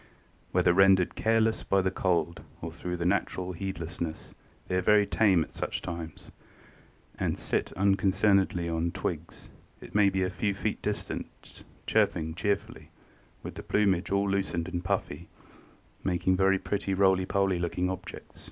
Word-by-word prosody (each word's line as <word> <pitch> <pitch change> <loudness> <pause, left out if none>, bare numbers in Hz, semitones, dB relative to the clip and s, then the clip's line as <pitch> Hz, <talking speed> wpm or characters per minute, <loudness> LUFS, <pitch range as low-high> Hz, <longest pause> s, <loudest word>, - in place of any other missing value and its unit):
"Whether - - +3
rendered 95 -1 +5
careless 110 0 +1
by 95 -1 +2
the 95 - +1
cold 85 -3 0 0.2
or - - -6
through 90 -1 -5
a 85 - -2
natural 95 -1 0
heedlessness, 85 -3 -5 0.3
they 90 - -1
are - - +2
very 105 +2 +5
tame 95 -6 +3
at - - -12
such - - -3
times; 85 -2 -7 0.9
they - - +1
sit - - -1
unconcernedly 95 -2 +2
on 80 0 -1
the 85 - -1
twigs, - - -5 0.3
it - - -12
may 100 -1 +5
be 95 0 -1
but 90 0 0
a - - -16
few 100 +2 -1
feet 105 +2 -2
distant, 105 0 -5 0.2
chirping 80 0 +1
cheerfully, 100 +4 -2 0.5
with - - -6
the - - -7
plumage 100 -4 +1
all 100 0 +2
loosened 95 -4 -1
and 90 -1 -4
puffy, 100 +1 -3 0.7
making 90 0 +1
very 95 +1 +3
pretty 100 0 -2
roly 95 -1 +3
poly 95 -2 +1
looking 90 +1 -1
objects." 95 0 -7
95 Hz, 155 wpm, -28 LUFS, 85-100 Hz, 0.9 s, rendered